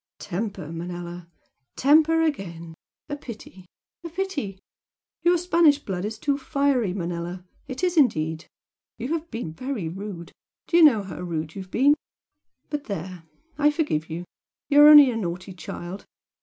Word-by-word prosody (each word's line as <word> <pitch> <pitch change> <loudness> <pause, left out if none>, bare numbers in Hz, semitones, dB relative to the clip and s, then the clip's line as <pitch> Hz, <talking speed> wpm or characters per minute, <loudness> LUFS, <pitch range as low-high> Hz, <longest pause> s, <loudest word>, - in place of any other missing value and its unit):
"Temper, 195 -5 -5
Manella! 175 +1 -6 0.5
temper 315 +4 +4
again! 170 - -3 0.3
A 290 - -3
pity, 210 -8 -11 0.4
a 335 - -6
pity! 320 - -3 0.6
Your 350 +1 +4
Spanish 335 -4 +4
blood 190 -9 -4
is 220 +1 -4
too 280 +4 -1
fiery, 275 - +1
Manella! 175 0 -4 0.2
it 260 +4 -6
is 360 -1 +1
indeed! 160 - +2 0.5
You 245 +3 -5
have 330 +1 -2
been 225 -9 -5
very 255 -3 -4
rude 185 -1 -7 0.3
do - - -2
you 340 - +7
know 230 -10 +6
how 190 - -8
rude 160 -3 -4
you 195 - -6
have 185 - -11
been? 275 +8 +4 0.8
But 295 -1 -3
there! 185 -3 -6 0.3
I 295 0 +5
forgive 295 - -1
you! 170 +2 -5 0.4
You 290 0 +6
are 295 - +10
only 295 -3 +10
a - - -4
naughty 180 -2 -4
child! 175 +1 -7
210 Hz, 155 wpm, -25 LUFS, 175-290 Hz, 0.8 s, are